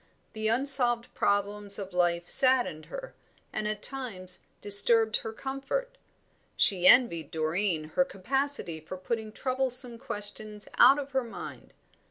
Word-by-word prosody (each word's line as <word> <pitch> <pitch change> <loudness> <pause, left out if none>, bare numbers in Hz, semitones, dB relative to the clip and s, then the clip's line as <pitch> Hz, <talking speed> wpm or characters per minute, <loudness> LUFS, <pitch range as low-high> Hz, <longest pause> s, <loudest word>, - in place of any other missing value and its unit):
The 220 0 -3
unsolved 240 -1 +2
problems 205 0 -1
of 195 -2 -8
life 175 -1 0
saddened 255 - +2
her, - - -9 0.4
and 215 0 -3
at 210 -1 -5
times 220 -10 -5 0.2
disturbed 220 +2 +6
her 225 - -7
comfort. 275 - -5 0.6
She 185 -2 +2
envied 210 -9 +4
Doreen 160 0 -2
her 270 - +3
capacity 270 - -3
for 160 +4 -9
putting 220 +3 -5
troublesome 255 -1 0
questions 210 -3 -7
out 270 +2 +7
of 280 -1 -6
her 265 -1 -1
mind. 230 - -11
220 Hz, 130 wpm, -27 LUFS, 195-260 Hz, 0.6 s, out